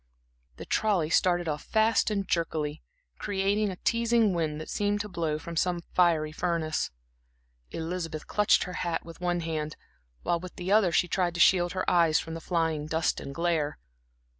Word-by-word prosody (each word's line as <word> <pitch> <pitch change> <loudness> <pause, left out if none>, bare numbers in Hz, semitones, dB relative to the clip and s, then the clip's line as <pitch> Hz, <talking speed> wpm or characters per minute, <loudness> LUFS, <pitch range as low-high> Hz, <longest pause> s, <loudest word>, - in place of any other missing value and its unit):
The - - -9
trolley 190 -8 +1
started 175 -1 +2
off 150 -1 -2
fast 220 +1 +2
and 200 -2 -2
jerkily, 155 -3 -1 0.4
creating 205 +1 0
a 185 - -5
teasing 230 0 +2
wind, 155 -3 -1
that 155 - -7
seemed 205 0 0
to 210 - -5
blow 165 -5 -2
from 170 +2 -8
some 175 0 0
fiery 165 -4 +3
furnace. 160 -1 -1 0.8
Elizabeth 165 -2 -4
clutched 210 -1 +3
her 180 - -6
hat 170 -2 -2
with 165 +1 -11
one 175 -1 0
hand, 155 -2 -3 0.5
while 170 - +1
with 180 +1 -9
the 180 +2 -4
other 205 -4 +4
she 180 - +2
tried 175 -1 0
to - - -4
shield 175 0 +4
her 185 - -2
eyes 165 -3 +4
from 165 - -6
the 165 - -6
flying 160 -3 -1
dust 160 +1 0
and 140 - -8
glare. 165 -3 0
175 Hz, 175 wpm, -28 LUFS, 160-185 Hz, 0.8 s, other